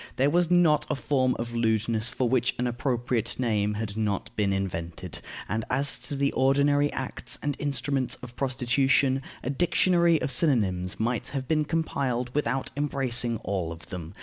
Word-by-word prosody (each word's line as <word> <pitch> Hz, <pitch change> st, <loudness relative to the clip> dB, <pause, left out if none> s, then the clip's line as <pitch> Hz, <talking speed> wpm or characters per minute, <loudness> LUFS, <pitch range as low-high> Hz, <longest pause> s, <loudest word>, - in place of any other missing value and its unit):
There 140 Hz, +3 st, +2 dB
was 175 Hz, 0 st, +2 dB
not 175 Hz, -4 st, +4 dB
a -, -, +1 dB
form 130 Hz, -1 st, +1 dB
of 120 Hz, 0 st, -4 dB
lewdness 110 Hz, 0 st, +1 dB
for 130 Hz, -, -1 dB
which 125 Hz, 0 st, +1 dB
an 125 Hz, -, 0 dB
appropriate 120 Hz, -2 st, -1 dB
name 105 Hz, -4 st, +1 dB
had 105 Hz, -1 st, -4 dB
not 105 Hz, -2 st, -2 dB
been 100 Hz, -2 st, +1 dB
invented; 85 Hz, -3 st, -4 dB, 0.3 s
and 110 Hz, +4 st, -1 dB
as 135 Hz, +1 st, 0 dB
to 125 Hz, +3 st, -4 dB
the 140 Hz, 0 st, +1 dB
ordinary 140 Hz, +2 st, +3 dB
acts 130 Hz, -1 st, -3 dB
and 145 Hz, -1 st, -1 dB
instruments 135 Hz, -2 st, -1 dB
of 120 Hz, -1 st, -9 dB
prostitution, 135 Hz, +1 st, +2 dB, 0.2 s
a 130 Hz, -, -1 dB
dictionary 170 Hz, +2 st, +3 dB
of -, -, -1 dB
synonyms 95 Hz, -, +1 dB
might 115 Hz, 0 st, -1 dB
have 135 Hz, -3 st, -4 dB
been 155 Hz, 0 st, +2 dB
compiled 130 Hz, -6 st, -1 dB
without 135 Hz, -2 st, -1 dB
embracing 130 Hz, -5 st, 0 dB
all 95 Hz, -5 st, -2 dB
of 80 Hz, -1 st, -10 dB
them. 85 Hz, 0 st, -7 dB
125 Hz, 165 wpm, -27 LUFS, 110-140 Hz, 0.3 s, not